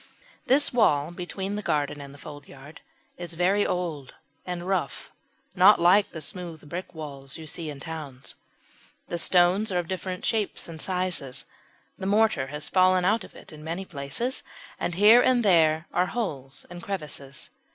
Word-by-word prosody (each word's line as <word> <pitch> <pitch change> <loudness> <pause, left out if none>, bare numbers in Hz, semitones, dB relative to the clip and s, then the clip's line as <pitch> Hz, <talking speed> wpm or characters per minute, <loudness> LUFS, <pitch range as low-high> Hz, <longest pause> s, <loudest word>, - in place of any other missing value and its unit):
This 280 +2 +4
wall 155 -10 +3
between 190 +2 -4
the 210 - -2
garden 145 -5 -1
and 140 -1 -9
the 140 - -13
foldyard 145 0 -11 0.4
is 175 -1 -7
very 190 +4 +2
old 160 -7 -3 0.3
and 175 0 -4
rough 185 -7 -2 0.4
not - - +7
like 185 +4 +5
the 160 - -7
smooth 170 -4 -7
brick 175 +3 -6
walls 140 -3 -7
you 160 - -9
see 160 +1 -3
in 145 -2 -7
towns. 145 -4 -6 0.8
The 170 - -2
stones 180 +5 +4
are 180 - 0
of 175 -2 -1
different 185 0 -4
shapes 215 -3 -1
and 160 -2 -6
sizes, 180 -8 -1 0.5
the 190 - -3
mortar 210 -9 +3
has 150 +2 -5
fallen 185 -1 +4
out 215 +2 +2
of - - -14
it - - -12
in 150 0 -11
many 170 +4 -4
places, 170 - -3 0.4
and 175 - -2
here 215 +6 +8
and 250 -3 +3
there 160 -4 +4
are 180 +1 +2
holes 140 - -4
and 175 0 -8
crevices. 150 -7 -6
175 Hz, 165 wpm, -26 LUFS, 150-190 Hz, 0.8 s, here